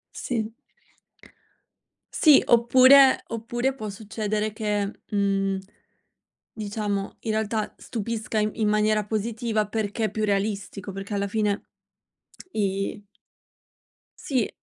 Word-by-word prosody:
Sì. 225 -2 -3 1.6
Sì, 300 -3 +6
oppure 260 +3 +6
oppure 240 +3 -2
può 215 -5 -6
succedere 210 +1 -3
che, 210 -2 -2
mhmm, 195 -2 +1 0.9
diciamo, 205 -2 -3
in 220 - -2
realtà 220 0 -1
stupisca 225 -1 -3
in 210 0 +1
in 215 -1 0
maniera 215 0 +2
positiva, 220 0 -1
perché 220 +1 -2
è - - -2
più 215 -1 -1
realistico, 200 -1 -2
perché 195 +2 -6
alla 200 0 0
fine 210 0 0 0.9
i 195 0 -2 1.2
Sì. 265 - 0
215 Hz, 105 wpm, -25 LUFS, 205-225 Hz, 1.6 s, Sì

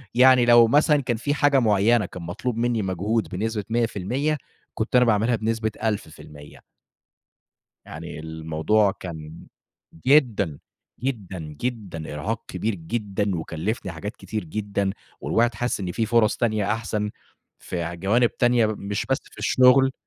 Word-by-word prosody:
يعني 130 -1 +6
لو 120 -1 +7
مثلًا 145 +3 +4
كان 120 -3 -1
في 145 +5 -1
حاجة 145 -2 +3
معيّنة 110 0 +3
كان 90 -1 -9
مطلوب 110 +7 -3
منّي 120 -2 +1
مجهود 100 +4 -1
بنسبة 105 +2 -2
100%، 120 +6 0 0.4
كنت 110 +3 -2
أنا 125 0 +6
باعملها 115 +2 +2
بنسبة 110 0 -1
1000%. 80 -8 -5 1.3
يعني 80 0 -8
الموضوع 80 +6 +1
كان 80 -3 -9 0.6
جدًا، 115 - +3 0.4
جدًا، 105 -9 -4
جدًا. 80 0 -5
إرهاق 105 +10 -3
كبير 110 -1 -2
جدًا 100 +1 -2
وكلّفني 90 +5 -3
حاجات 100 +8 -6
كتير 110 -3 -5
جدًا 100 +2 -2 0.3
والواحد 115 0 +1
حاسس 120 -2 -1
إن 90 -2 -3
في 110 +4 -1
فُرَص 115 -1 +3
تانية 110 -3 0
أحسن 110 -2 -2 0.5
في 85 -1 -4
جوانب 110 +7 +2
تانية 120 -2 +4
مش 100 -1 -3
بس 135 - +2
في - - -19
الشغل. 130 +1 +5
110 Hz, 135 wpm, -24 LUFS, 95-120 Hz, 1.3 s, لو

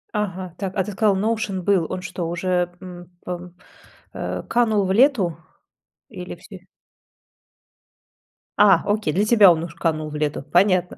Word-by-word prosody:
Ага. 185 -4 -3
Так, 190 -2 -4
а 190 - +2
ты 210 - -6
сказал, 200 -1 +2
Notion 215 -3 -1
был. 180 -3 +1
Он 185 - -4
что, 175 -2 -5
уже, 180 0 -1
м, 175 -2 -11 0.2
пам 180 0 -6 0.6
э, - - -4
канул 220 -4 +1
в 190 - 0
лету? 215 - +3 0.7
Или 180 -5 -8
вси 185 +1 -14 1.9
А, 195 -5 +6
окей! 205 -7 0
Для 205 +3 +1
тебя 210 -5 +7
он 165 0 0
уж 170 -1 -8
канул 155 -2 -2
в 150 - -8
лету. 150 -1 -2
Понятно. 180 -1 +2
185 Hz, 155 wpm, -22 LUFS, 175-205 Hz, 1.9 s, тебя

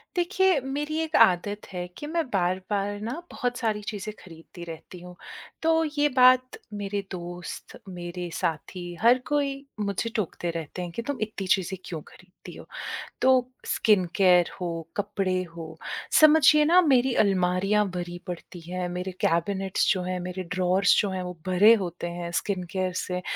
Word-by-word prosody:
देखिए, 375 -1 +3
मेरी 295 +4 -3
एक 320 -1 -2
आदत 205 +3 +3
है 180 -1 -4
कि 295 - -6
मैं 335 +1 0
बार-बार 195 +1 -1
ना 230 +4 -3 0.2
बहुत 245 -1 -2
सारी 220 -3 -1
चीज़ें 210 +1 -5
खरीदती 170 0 -12
रहती 165 +2 -9
हूँ। 180 0 -11 0.5
तो 325 0 +3
ये 290 0 +4
बात 255 0 +5 0.2
मेरे 205 0 -3
दोस्त, 175 -1 -7
मेरे 175 0 -6
साथी, 165 +3 -3 0.2
हर 240 +3 +6
कोई 290 -2 +1 0.3
मुझे 205 +2 -1
टोकते 175 -4 -2
रहते 165 +2 -5
हैं 175 -1 -5
कि, 235 - -4
"तुम 280 +3 -4
इतनी 210 -3 -3
चीज़ें 190 +1 +1
क्यों 160 -3 -5
खरीदती 180 0 -14
हो?" - - -11 0.6
तो 255 -1 +4 0.2
स्किन 205 -4 +3
केयर 180 -3 +5
हो, 180 - -2 0.3
कपड़े 190 -2 -1
हों, 160 -1 -7 0.5
समझिए 305 -1 +7
ना, 345 +4 +6
मेरी 255 0 +3
अलमारियाँ 195 +2 +2
भरी 175 -1 -5
पड़ती 175 0 -7
हैं, 180 0 -3
मेरे 180 +1 -4
कैबिनेट्स 190 +3 +1
जो 185 -3 -2
हैं, 180 0 -2
मेरे 185 +1 -4
ड्रॉर्स 185 +1 +3
जो 205 - 0
हैं, 185 -1 -3
वो 180 0 -6
भरे 190 +5 +6
होते 175 -1 -5
हैं 170 0 -4
स्किन 190 -3 -3
केयर 185 -1 -1
से 180 0 -3
190 Hz, 160 wpm, -26 LUFS, 180-240 Hz, 0.6 s, समझिए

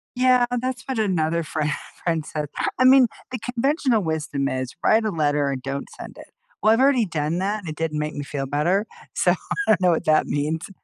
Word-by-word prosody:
Yeah, 250 -1 +4 0.2
that's 255 0 -3
what 260 -4 -2
another 170 -5 +1
friend 155 0 -2 0.3
friend 165 -3 0
said. 150 -1 -4 0.3
I 255 - +5
mean, 260 -1 +7 0.2
the 250 - -4
conventional 250 0 +1
wisdom 155 -4 -2
is 130 -1 -4
write 220 +1 +4
a 215 - 0
letter 145 -4 +1
and 135 -2 -3
don't 140 +1 -4
send - - -9
it. - - -13 0.3
Well, 215 - +5
I've 225 - +2
already 265 -4 +4
done 165 -1 -2
that, 205 +3 -1
and 180 -6 -8
it 155 - -5
didn't 155 -1 -2
make 150 0 -3
me 145 - -5
feel 140 -1 -4
better. 170 +9 +1 0.3
So - - +3 0.3
I 215 - +6
know 180 -1 +3
what 165 - -1
that 155 0 +4
means. 155 +5 -2
165 Hz, 210 wpm, -23 LUFS, 150-225 Hz, 0.3 s, mean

